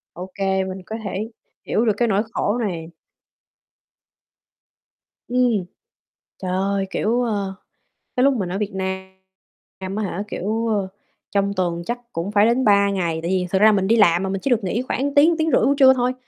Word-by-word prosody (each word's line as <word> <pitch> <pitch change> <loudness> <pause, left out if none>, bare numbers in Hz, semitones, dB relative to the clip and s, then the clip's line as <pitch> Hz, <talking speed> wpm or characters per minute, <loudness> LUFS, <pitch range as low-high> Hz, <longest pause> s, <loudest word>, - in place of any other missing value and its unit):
OK, 185 +3 -9 0.3
mình 190 0 -6
có 220 - -5
thể 200 +3 -4 0.4
hiểu 225 - +1
được 220 - +3
cái 240 +2 +1
nỗi 200 -1 +2
khổ 210 +4 0
này. 170 -7 -4 2.4
Ừm, 245 -5 +2 0.7
trời 185 -1 -4
ơi, 195 +1 0
kiểu, 235 +4 0
ơ, 200 -5 -2 0.6
cái 250 - +2
lúc 275 +1 +5
mình 195 -8 -2
ở 185 - -3
Việt 210 0 -2
Nam 190 0 -8
á 215 - -1
hả, 195 0 -3
kiểu, 220 +3 -2
ơ, 205 -3 0 0.4
trong 200 0 +1
tuần 175 -3 -1
chắc 240 +4 -3
cũng 170 +5 -3
phải 205 0 +4
đến 240 +3 +2
3 200 -1 +4
ngày, 175 -5 -1
tại 170 +3 -2
vì 185 -1 0
thực 190 +1 +1
ra 215 +1 +7
mình 195 -2 +1
đi 230 - +4
làm 175 -4 +4
mà 190 - -2
mình 195 0 -3
chỉ - - -1
được 230 -3 +2
nghỉ 205 +6 -1
khoảng 280 +2 -2
tiếng, 315 +4 +6
tiếng 320 0 0
rưỡi - - +4
buổi 280 - +3
trưa 265 -2 +7
thôi. 250 0 0
200 Hz, 190 wpm, -21 LUFS, 190-230 Hz, 2.4 s, ra